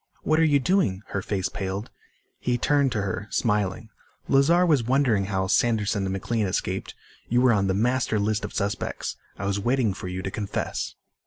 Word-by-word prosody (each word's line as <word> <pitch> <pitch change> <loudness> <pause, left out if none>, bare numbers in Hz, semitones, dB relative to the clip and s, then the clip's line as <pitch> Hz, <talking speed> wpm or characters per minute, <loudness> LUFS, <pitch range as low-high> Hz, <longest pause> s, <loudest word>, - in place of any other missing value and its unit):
"What 155 +1 +2
are - - +5
you 145 -3 +4
doing?" 140 - +1
her 100 - -2
face 95 -1 -1
paled. 95 +2 -4 0.5
He 125 -1 0
turned 140 +1 +2
to 105 -3 -1
her, 100 +2 -3
smiling. 105 -1 0 0.4
"Lazar 165 +7 +4
was 150 -7 +4
wondering 125 -5 +2
how 95 -1 -1
Sanderson 105 -1 +1
and 95 - -2
McLean 105 +2 -1
escaped. 90 - -3 0.3
You 120 - +3
were 125 -1 +5
on 100 -2 +2
the 95 - +1
master 120 +1 +1
list 105 +1 0
of - - -4
suspects. 100 0 -3 0.2
I 100 - -4
was 100 0 0
waiting 120 -1 +1
for 95 - -7
you 90 0 -4
to 95 - -3
confess." 100 -1 -3
105 Hz, 185 wpm, -25 LUFS, 100-130 Hz, 0.5 s, are